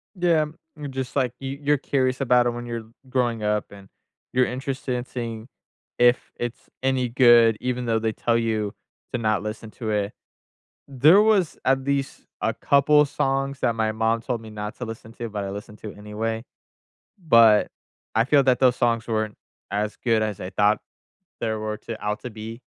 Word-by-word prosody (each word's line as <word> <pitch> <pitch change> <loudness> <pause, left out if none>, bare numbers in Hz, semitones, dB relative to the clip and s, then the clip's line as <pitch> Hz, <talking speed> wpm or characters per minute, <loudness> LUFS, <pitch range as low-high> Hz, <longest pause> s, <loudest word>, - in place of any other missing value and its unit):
Yeah. 170 -4 +3 0.4
Just 130 -2 -5
like 130 -4 +1
you 135 +1 -5
you're 145 +1 +3
curious 130 -1 0
about 125 -2 +4
it - - +1
when 120 0 -6
you're 115 -1 -5 0.2
growing 120 -3 0
up, 105 0 -1
and 100 -1 -13 0.4
you're 130 0 +3
interested 130 0 -3
in 125 0 -3
seeing 115 -3 -6 0.5
if 120 +1 +3
it's 120 -1 -5
any 130 -2 +1
good 120 -2 +6
even 125 0 -2
though 115 -1 +1
they 110 0 0
tell 115 +1 0
you 110 -3 -1 0.4
to - - +1
not 110 -3 +1
listen 110 +1 -6
to 110 -2 -4
it. 105 0 -1 0.8
There 145 +8 +6
was 210 -6 +2
at 135 0 +2
least 140 0 -2
a - - +1
couple 150 +1 +4
songs 135 -1 -1
that 115 - +1
my 110 -1 +1
mom 110 +1 +1
told 120 0 -3
me 110 -1 -11
not 105 0 -6
to 125 - -4
listen 115 -1 -8
to, 120 -1 -5
but 105 -2 -4
I 100 - -4
listened 105 +1 -8
to 105 - -7
it - - -14
anyway, 110 +2 -3 0.8
but 115 -5 +6 0.5
I 115 +1 +4
feel 140 +1 +4
that 130 -1 +3
those 130 -2 +4
songs 115 -2 +1
weren't 110 -2 -1 0.4
as 105 +1 -1
good 115 -3 +3
as 105 -3 -3
I 90 - -5
thought 105 +2 +3 0.6
they 115 - -1
were 110 0 -3
to 110 0 -8
out 105 0 -1
to 125 - -5
be 110 +2 -8
115 Hz, 185 wpm, -24 LUFS, 110-130 Hz, 0.8 s, good